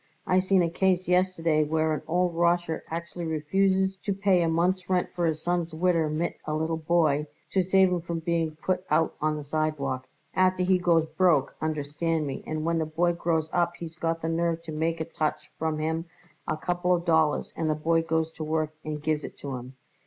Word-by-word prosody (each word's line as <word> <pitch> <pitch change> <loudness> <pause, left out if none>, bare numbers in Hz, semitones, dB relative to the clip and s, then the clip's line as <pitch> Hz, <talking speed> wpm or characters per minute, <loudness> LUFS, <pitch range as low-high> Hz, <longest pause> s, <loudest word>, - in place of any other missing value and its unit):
I 185 - +3
seen 185 -1 +3
a 170 - +1
case 185 0 +1
yesterday 180 -4 +2
where 155 +1 +1
an 150 - -2
old 180 +1 +1
Rosher 170 -1 +1
actually 170 +1 -5
refuses 190 +5 +1
to 195 +2 -3
pay 195 -2 +3
a 165 - +2
month's 180 +3 +1
rent 180 -1 +1
for 175 -1 0
his 155 -1 -2
son's 175 -2 -1
widder 165 -2 +2
mit 160 +3 -2
a 155 - -1
little 160 +1 0
boy, 155 -2 +2 0.2
to 190 - +3
save 190 +1 +4
'em 170 -1 -2
being 165 -1 -1
put 185 -1 0
out 155 +2 +2
on 155 0 +1
the 150 - -5
sidewalk. 140 -4 -2 0.3
Afterward 185 -1 +2
he 185 - +4
goes 170 -3 +3
broke, 160 -4 +2
understand 155 +1 -1
me, 135 -2 -5
and 155 0 -3
when 165 0 +1
the 160 - 0
boy 170 +3 +1
grows 165 -2 0
up 175 -1 +1
he's 165 -1 -8
got 165 -1 -2
the - - 0
nerve 165 0 0
to 160 - -7
make 160 +2 -1
a 160 - -2
touch 155 -2 -3
from 160 -1 -1
him 160 +2 -1 0.4
a - - -1
couple 175 +2 +1
of 170 0 -4
dollars 160 -2 +2
and 160 -1 -1
the 155 - +2
boy 165 +2 +2
goes 160 0 0
to 160 - -7
work 155 0 -1
and 150 -1 -5
gives 155 -1 0
it - - -8
to 140 -2 -5
him. 125 +1 -9
165 Hz, 210 wpm, -27 LUFS, 155-175 Hz, 0.4 s, save